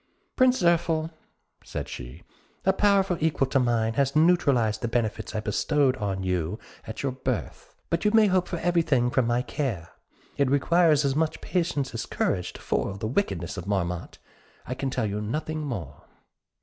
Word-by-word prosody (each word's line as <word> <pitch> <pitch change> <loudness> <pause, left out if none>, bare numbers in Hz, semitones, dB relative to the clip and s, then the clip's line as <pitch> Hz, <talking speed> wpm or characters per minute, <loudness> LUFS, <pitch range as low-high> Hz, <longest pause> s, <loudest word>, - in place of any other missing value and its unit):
"Prince 255 -2 +4
Zirphil," 165 -2 +2 0.5
said - - -5
she, 60 +7 -9 0.4
"a 190 - +4
power 200 -1 +4
equal 155 -3 +1
to 135 +1 +1
mine 115 -3 +1
has 140 +3 +1
neutralized 140 -10 +3
the 120 - -1
benefits 115 -2 -2
I 110 - 0
bestowed 130 +5 +1
on 95 -3 -2
you 90 +1 -1 0.3
at 110 - -6
your 135 - 0
birth; 130 -2 -4 0.2
but 170 - 0
you 210 - +4
may 220 0 +5
hope 185 -2 +2
for 175 - -3
everything 160 -8 +2
from 130 -3 +2
my 120 +1 +1
care. 115 - -3 0.5
It 140 -2 +2
requires 150 +1 +3
as 135 -1 +1
much 155 +1 0
patience 165 -8 -1
as 115 - -4
courage 90 -2 -1
to - - -11
foil 95 - -1
the 100 - -5
wickedness 100 - -1
of 90 +1 -6
Marmotte; 90 -4 -2 0.5
I 125 - -3
can 135 +1 -3
tell 125 -3 -1
you 105 0 -2
nothing 155 +8 -3
more." 85 - -6
130 Hz, 175 wpm, -26 LUFS, 105-160 Hz, 0.5 s, may